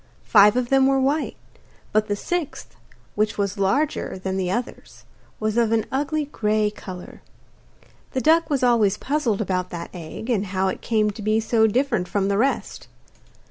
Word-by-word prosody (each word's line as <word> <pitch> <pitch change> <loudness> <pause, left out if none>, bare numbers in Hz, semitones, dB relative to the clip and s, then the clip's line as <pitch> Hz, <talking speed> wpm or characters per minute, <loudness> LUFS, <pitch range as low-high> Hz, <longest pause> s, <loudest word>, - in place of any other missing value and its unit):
Five 205 +2 +6
of 245 -1 0
them 270 0 +4
were 270 0 +3
white, 280 +4 0 0.6
but 215 0 +2
the 205 - 0
sixth, 320 +6 -4 0.4
which 210 0 0
was 200 0 -2
larger 270 +6 0
than 190 0 -3
the 185 -2 -1
others, 240 +6 -5 0.4
was 215 +1 -1
of 230 -2 +2
an 225 -1 +1
ugly 295 +3 -1
grey 215 -5 0
colour. 185 -3 -10 0.9
The 260 - 0
duck 320 +2 +3
was 280 -4 0
always 220 -5 +3
puzzled 270 -8 -1
about 185 -2 -1
that 170 -1 -7
egg, 175 +5 -8
and 205 -3 0
how 190 0 0
it - - -5
came 215 -2 +1
to 215 +2 -10
be 215 +1 +1
so 220 0 +3
different 235 -4 0
from 200 0 0
the 200 0 +1
rest. 270 +4 -1
215 Hz, 175 wpm, -23 LUFS, 200-265 Hz, 0.9 s, Five